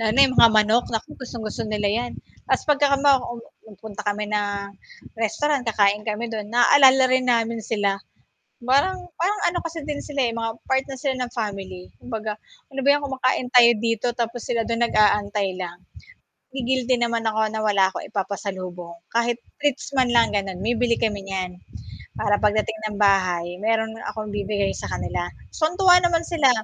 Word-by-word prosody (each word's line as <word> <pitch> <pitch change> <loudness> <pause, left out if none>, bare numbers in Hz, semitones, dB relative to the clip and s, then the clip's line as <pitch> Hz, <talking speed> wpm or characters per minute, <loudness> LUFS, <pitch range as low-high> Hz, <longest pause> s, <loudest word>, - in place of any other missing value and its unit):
Lalo 220 -1 +1
na - - +8
yung 260 -1 -1
mga 230 - +8
manok, 215 +2 +4
naku, 225 -1 -4
gustong-gusto 225 -3 -5
nila 210 -1 0
yan. 235 +4 -1 0.4
Tas - - +1
pagkakama 280 -2 +3
um, 240 -1 -7 0.3
hmm, 210 - -14
punta 215 -2 -8
kami 205 +1 -1
ng 205 -1 -2 0.5
restaurant, 265 +5 0
kakain 205 -1 +2
kami 225 +2 -3
do'n, 210 -2 -5
naalala 260 +3 +6
rin 255 0 +2
namin 230 -1 +1
sila. 200 -2 -1 0.6
Parang 280 +9 +2 0.2
parang 405 +5 0
ano 350 - -2
kasi 330 -1 -6
din 295 -1 -4
sila, 285 -2 -3
eh, - - -7
mga 230 0 -2 0.2
part 265 0 +2
na 270 - -7
sila 265 +1 -2
ng 250 -1 -3
family, 195 -5 -5
kumbaga, 220 -3 -5 0.3
"Ano 270 0 -4
ba - - +5
yan 290 - -1
kumakain 260 -2 -1
tayo 240 -2 +8
dito, 230 0 0
tapos 235 0 -3
sila 235 -2 0
do'n 230 +1 0
nag-aantay 205 -3 +1
lang". 175 -1 -7 0.7
Nagi-guilty 255 -1 0
naman 235 -1 0
ako, 220 0 0
na 220 - -3
wala 200 -3 +2
akong - - -7
ipapasalubong, 185 -4 -5 0.2
kahit 235 0 +1 0.2
treats 285 -1 -1
man 260 -2 +2
lang, 235 -1 +3
gano'n, 195 -2 -2
bibili 235 +1 +1
kami 210 -3 -1
niyan, 185 -2 -4 0.6
para 205 -1 +1
pagdating 215 +1 +1
ng 205 - -7
bahay, 185 -4 +2
meron 220 0 0 0.2
akong 215 -2 -6
ibibigay 200 -1 -1
sa - - -6
kanila. - - -3 0.2
Tuwan-tuwa 360 +3 +4
naman 340 -1 +1
sila, 315 -6 +3
225 Hz, 170 wpm, -23 LUFS, 205-255 Hz, 0.7 s, na